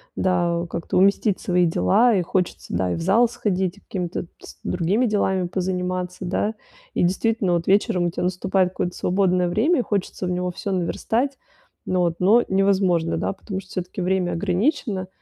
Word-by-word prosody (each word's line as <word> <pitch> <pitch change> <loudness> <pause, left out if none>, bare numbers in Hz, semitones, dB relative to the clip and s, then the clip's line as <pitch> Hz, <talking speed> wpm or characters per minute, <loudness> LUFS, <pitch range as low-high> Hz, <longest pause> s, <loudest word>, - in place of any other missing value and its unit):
Да 175 -2 +1
как-то 170 +1 -3
уместить 200 +1 +3
свои 180 -1 +2
дела, 165 - +3
и 190 - +2
хочется, 180 - -2
да, 90 0 0
и - - 0
в - - -5
зал 205 +8 +4
сходить, 190 -5 -2
и - - -15
какими-то 180 -2 -4
с - - -13
другими 190 +8 +1
делами 190 -4 +1
позаниматься, 180 0 -3
да. 205 +4 -1 0.4
И - - 0
действительно, 190 +1 +1
вот 170 0 0
вечером 195 -2 +2
у - - +1
тебя - - -3
наступает 185 +1 +1
какое-то 180 -1 -3
свободное 180 -1 +1
время, 255 - +2
и - - +3
хочется 195 -3 -2
в - - -2
него 180 0 -1
всё 195 +3 -5
наверстать, 225 +9 -1 0.5
но 185 -1 0
вот 170 -2 +1
но 215 +6 +5
невозможно, 190 -4 +2
да, - - -1
потому 195 0 -6
что 190 -1 -14
всё-таки 185 0 -4
время 180 -1 0
ограничено, 195 - 0
185 Hz, 180 wpm, -23 LUFS, 180-200 Hz, 0.5 s, но